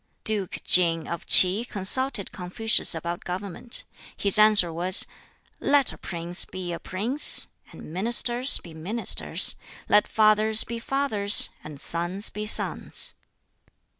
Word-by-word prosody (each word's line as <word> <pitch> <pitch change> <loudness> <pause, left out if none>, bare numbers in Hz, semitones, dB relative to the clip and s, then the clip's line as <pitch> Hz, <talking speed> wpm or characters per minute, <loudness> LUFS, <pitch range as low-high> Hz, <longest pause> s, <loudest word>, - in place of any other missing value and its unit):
Duke 210 -4 -3
King 165 -2 +3
of 170 - -8
Ts'i 190 +5 +7
consulted 235 +1 -1
Confucius 185 +2 0
about 170 +2 -7
government. 190 +5 -4 0.3
His 200 +1 +2
answer 210 -6 +4
was, 180 +3 +2 0.5
"Let 280 -1 0
a - - -14
prince 170 0 -1
be 180 -2 -8
a 170 - -7
prince, 230 +10 +2 0.3
and 155 - -13
ministers 240 +6 +3
be 170 - -14
ministers; 195 +9 -1 0.3
let 210 0 +2
fathers 215 0 +2
be 235 0 -8
fathers, 230 -6 -1
and 150 -2 -12
sons 175 +7 -2
be 210 0 -7
sons." - - -1
200 Hz, 125 wpm, -23 LUFS, 175-225 Hz, 0.5 s, Ts'i